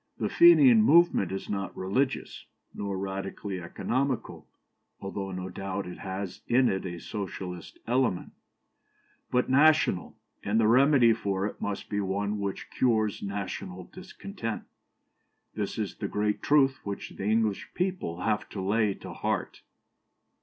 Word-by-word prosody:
"The - - -1
Fenian 285 -9 +7
movement 170 - +4
is 95 - -4
not 100 -2 -4
religious, 115 +9 -2 0.3
nor 100 -1 -3
radically 95 0 -4
economical 130 +9 -2 0.5
(though 95 0 -5
no 90 0 -5
doubt 95 +1 -4
it 90 - -8
has 95 -1 -5
in 125 +1 +4
it 95 0 -2
a 85 -1 -6
socialistic 95 -3 -7
element), 120 -6 0 1.0
but 125 0 +1
national, 145 - +3 0.2
and 105 +3 +1
the 110 - +4
remedy 125 0 +6
for 100 -3 -2
it 105 - -5
must 105 -1 -3
be 105 -1 -1
one 100 +2 -1
which 100 -1 -4
cures 110 -5 +1
national 95 -2 -5
discontent. 185 - -6 0.9
This - - -3
is - - -2
the - - -4
great 105 0 -1
truth 135 -2 +3
which 100 -1 -5
the 95 - -6
English 110 -1 +1
people 180 - -2
have 105 +1 -1
to 100 - -6
lay 100 +1 +1
to - - -9
heart." - - -3
105 Hz, 140 wpm, -28 LUFS, 95-125 Hz, 1.0 s, Fenian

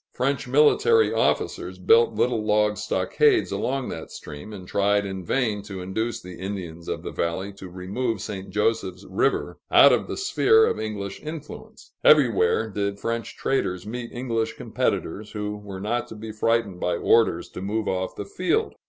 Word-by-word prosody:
French 135 +1 -1
military 150 - +4
officers - - 0
built 460 0 +4
little 120 -3 +1
log 105 0 +2
stockades 420 - +2
along 135 -1 -1
that 80 - -6
stream, 75 +7 -9
and 95 -4 -9
tried 100 +1 +2
in 95 -1 -5
vain 110 +1 0
to 100 -2 -8
induce 110 +6 -2
the 90 -1 -10
Indians 90 -4 -6
of - - -3
the - - -5
valley 95 +4 -2
to 95 -1 -10
remove 100 +6 -3
to 95 - -7
St. 95 -2 -6
Joseph's 100 -2 -1
River, 95 +9 0
out - - +8
of - - 0
the - - -4
sphere 440 +2 +4
of - - -1
English 105 -2 -5
influence. 155 -1 -9
Everywhere 460 -2 +4
did 100 0 -2
French 115 +1 -3
traders 90 -9 -1
meet 120 +2 -5
English 115 -2 -2
competitors, 105 +1 -2
who 105 -1 -3
were 100 -2 -8
not 120 +5 -1
to - - -9
be 110 +1 -7
frightened 110 -3 0
by 90 - 0
orders 110 -2 +3
to - - -8
move 105 +2 -2
off 95 0 -2
the - - -5
field. - - 0
105 Hz, 170 wpm, -24 LUFS, 95-125 Hz, -, out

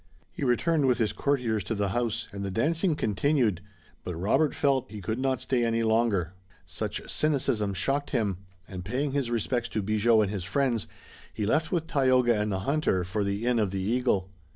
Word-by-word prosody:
He - - -6
returned 140 +4 +2
with 125 -3 +3
his 110 -3 0
courtiers 120 -7 0
to 115 - -2
the 100 -1 0
house, 115 +1 -1
and 100 -1 -6
the 100 - -2
dancing 160 - +1
continued, 110 - +1 0.4
but 90 - -4
Robert 135 - +1
felt 135 -3 +1
that - - -10
he - - -5
could 110 +5 -3
not 130 -1 0
stay 130 -2 0
any 115 0 +1
longer. 110 -6 +1 0.3
Such - - -4
cynicism 125 -9 0
shocked 140 +9 0
him, 105 -8 -1 0.3
and 90 -2 -7
paying 130 +9 -1
his 135 -3 -1
respects 120 +1 -1
to 110 - -2
Bigot 110 +2 +3
and 100 - -2
his 100 -4 -3
friends, 120 +2 0 0.4
he 105 - -3
left 155 +9 +1
with 170 -3 0
Tayoga 130 -6 +3
and 105 0 -1
the 95 -1 -2
hunter 140 -8 +1
for 100 +4 -2
the 100 +3 -2
Inn 120 -1 +2
of 105 -3 +1
the 95 +1 -3
Eagle. 105 -3 0
115 Hz, 200 wpm, -27 LUFS, 100-135 Hz, 0.4 s, with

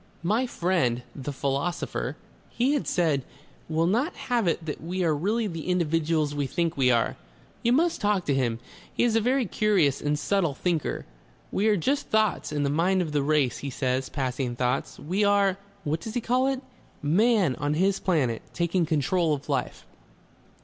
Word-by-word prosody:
"My 220 +9 +1
friend, 170 - 0
the 145 0 -5
philosopher," 140 +5 -2 0.3
he 255 +4 +1
had 290 - -1
said, 155 -7 +1 0.5
"will 160 +1 +1
not 240 - +1 0.2
have 235 -6 +2
it 170 -1 0
that 150 - -5
we 180 +4 -2
are 165 -2 +3
really 210 +9 0
the 165 -5 -5
individuals 165 -3 +1
we 145 -2 -1
think 170 +2 -1
we 130 -2 +3
are. 120 -2 +2 0.4
You 235 - +2
must 330 +3 +2
talk 205 -3 +1
to 145 - +1
him 125 -4 0 0.3
he - - 0
is 235 -2 +2
a 225 - +4
very 255 +3 +2
curious 190 -9 +2
and 145 0 0
subtle 170 -3 0
thinker. 170 -2 -1 0.5
We 205 +3 +1
are 210 -2 +4
just 280 - 0
thoughts 215 -6 +1
in 145 -1 0
the 140 - +1
Mind 180 +5 +2
of 160 - -5
the 145 -1 +1
Race, 145 -3 +1
he 140 - -4
says, 130 0 -1
passing 130 -2 -2
thoughts. 125 0 -1
We 185 +7 -1
are 200 -1 +3 0.2
what 155 +1 -1
does 220 +5 -7
he 245 - 0
call 250 +3 +2
it? 270 -1 -1 0.4
Man 190 - +3
on 145 +1 -1
his 190 +4 +2
Planet, 135 -11 +1
taking 170 0 +1
control 160 +1 +1
of 145 +1 -11
life." 135 -3 -2
170 Hz, 185 wpm, -26 LUFS, 145-205 Hz, 0.5 s, a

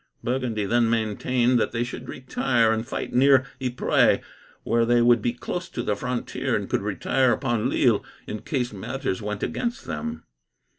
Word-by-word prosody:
Burgundy 120 -4 -1
then 115 +2 +2
maintained 120 +3 +1
that - - 0
they 115 0 0
should 120 - -7
retire, 120 -3 +1
and 110 +1 -3
fight - - -4
near 135 0 +5 0.2
Ypres, 125 -1 +3 0.5
where 115 0 +2
they 120 +1 +3
would 120 -1 +5
be 120 - +1
close 175 +8 -5
to - - -4
the 105 - 0
frontier, 125 +1 -2
and - - -2
could - - 0
retire 130 -2 +1
upon 120 -5 0
Lille - - +3 0.2
in 105 - -5
case 125 -1 -2
matters 115 +1 -3
went 105 0 -4
against 240 -1 -3
them. 235 +1 -5
120 Hz, 165 wpm, -25 LUFS, 115-130 Hz, 0.5 s, near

